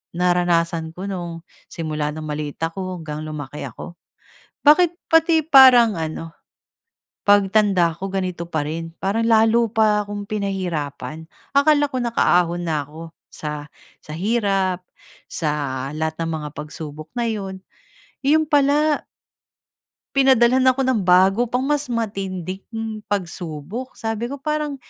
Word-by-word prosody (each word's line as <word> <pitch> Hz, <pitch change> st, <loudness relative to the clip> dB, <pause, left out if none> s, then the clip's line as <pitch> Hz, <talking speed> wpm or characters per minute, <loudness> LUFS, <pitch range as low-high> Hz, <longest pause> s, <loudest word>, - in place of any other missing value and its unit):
naranasan 170 Hz, -2 st, +1 dB
ko 185 Hz, -, -7 dB
nung 170 Hz, -3 st, -5 dB, 0.2 s
simula 155 Hz, -2 st, -3 dB
nung 155 Hz, -, -6 dB
maliit 150 Hz, -1 st, -4 dB
ako, 185 Hz, +2 st, -3 dB
hanggang 155 Hz, 0 st, -5 dB
lumaki 150 Hz, -2 st, -6 dB
ako. 175 Hz, -1 st, -10 dB, 0.7 s
Bakit 335 Hz, +3 st, +5 dB, 0.2 s
pati 325 Hz, 0 st, +4 dB
parang 255 Hz, -, +7 dB
ano, 160 Hz, +1 st, -4 dB, 1.0 s
pagtanda 200 Hz, -3 st, +4 dB
ko, 195 Hz, -, -4 dB
ganito 180 Hz, -3 st, -3 dB
pa 155 Hz, -3 st, -2 dB
rin? 165 Hz, +2 st, -5 dB
Parang 215 Hz, +4 st, 0 dB
lalo 225 Hz, +1 st, +4 dB
pa 210 Hz, -2 st, +2 dB
akong 205 Hz, 0 st, -5 dB
pinahirapan. 170 Hz, -7 st, -3 dB, 0.3 s
Akala 290 Hz, 0 st, +4 dB
ko 255 Hz, -, -2 dB
nakaahon 175 Hz, -7 st, +2 dB
na 155 Hz, -4 st, -1 dB
ako 160 Hz, +2 st, -10 dB, 0.2 s
sa 150 Hz, -1 st, -5 dB, 0.3 s
sa 150 Hz, -, -10 dB
hirap. 195 Hz, -2 st, 0 dB, 0.4 s
Sa 155 Hz, -3 st, -2 dB, 0.5 s
lahat 160 Hz, +1 st, -3 dB
ng 165 Hz, -, -2 dB
mga 150 Hz, -1 st, -4 dB
pagsubok 150 Hz, +1 st, -8 dB
na 240 Hz, -, +1 dB
'yon. 195 Hz, -4 st, -4 dB, 0.6 s
'Yon 310 Hz, +2 st, +3 dB
pala 295 Hz, +1 st, +3 dB, 1.1 s
Pinadalhan 260 Hz, -1 st, +4 dB
ako 260 Hz, +1 st, +3 dB
ng 255 Hz, -5 st, +1 dB
bago 190 Hz, +6 st, +4 dB
pang 250 Hz, +2 st, -1 dB
mas 290 Hz, 0 st, 0 dB
matinding 210 Hz, 0 st, -4 dB
pagsubok. 185 Hz, -, -5 dB
Sabi 225 Hz, +1 st, -3 dB
ko, 280 Hz, -, -5 dB
"Parang 300 Hz, 0 st, -2 dB
195 Hz, 125 wpm, -21 LUFS, 165-240 Hz, 1.1 s, parang